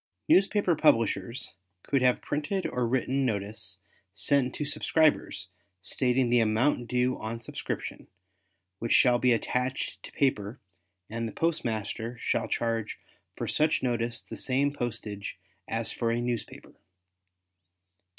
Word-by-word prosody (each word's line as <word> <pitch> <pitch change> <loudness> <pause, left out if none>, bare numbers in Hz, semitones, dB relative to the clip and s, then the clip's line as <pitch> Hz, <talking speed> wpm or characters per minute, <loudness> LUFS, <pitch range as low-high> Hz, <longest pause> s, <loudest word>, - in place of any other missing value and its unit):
Newspaper 195 -2 +4
publishers 115 - +2 0.3
could 140 -2 +1
have 125 -1 +3
printed 155 +6 -1
or 125 -1 0
written 130 +2 +1
notice 100 -4 -2 0.4
sent 140 0 +2
to 150 - -2
subscribers 150 - +1 0.3
stating 125 +1 +1
the 120 - +5
amount 115 +3 +2
due 125 +1 +1
on 110 +1 -4
subscription, 115 - -5 0.7
which 115 - 0
shall 125 -1 +5
be 125 0 +4
attached 125 +2 -1
to - - -9
paper 120 -4 0 0.5
and 115 +1 -3
the - - -5
postmaster 115 -7 -2
shall - - 0
charge 115 -2 -1 0.4
for - - -4
such 155 -2 +2
notice 120 -2 -1
the - - -8
same 140 +2 +1
postage 110 -7 -4 0.3
as 115 0 -2
for 115 - -1
a 115 +1 +1
newspaper. 120 -1 -4
120 Hz, 125 wpm, -29 LUFS, 115-135 Hz, 0.7 s, the